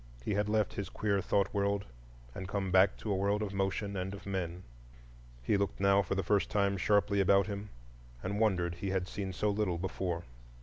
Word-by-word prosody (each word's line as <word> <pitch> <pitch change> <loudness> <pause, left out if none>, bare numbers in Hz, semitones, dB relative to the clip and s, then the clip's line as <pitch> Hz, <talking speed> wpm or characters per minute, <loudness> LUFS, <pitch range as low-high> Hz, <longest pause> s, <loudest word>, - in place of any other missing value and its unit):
He - - 0
had 105 +1 0
left 105 -1 +1
his 100 - -4
queer 100 -2 0
thought 100 0 +1
world 100 0 0 0.5
and 95 +5 -6
come 100 -1 -2
back 95 +2 +5
to 110 - -4
a - - +2
world 100 +2 +1
of 100 -2 -4
motion 100 +1 -1
and 95 +1 -3
of 100 - -12
men. 90 -2 -3 0.8
He 100 - +2
looked 100 0 -1
now 100 0 +5
for 95 0 -2
the 95 - 0
first 100 +2 +2
time 100 -1 +2
sharply 100 +1 +2
about 100 +1 +5
him, 105 0 -5 0.5
and 100 +2 -2
wondered 90 -6 +2
he 95 +3 -4
had 95 -1 -1
seen 95 -1 -4
so 105 +3 0
little 100 -4 0
before. 90 -1 -3
100 Hz, 205 wpm, -32 LUFS, 95-100 Hz, 0.8 s, back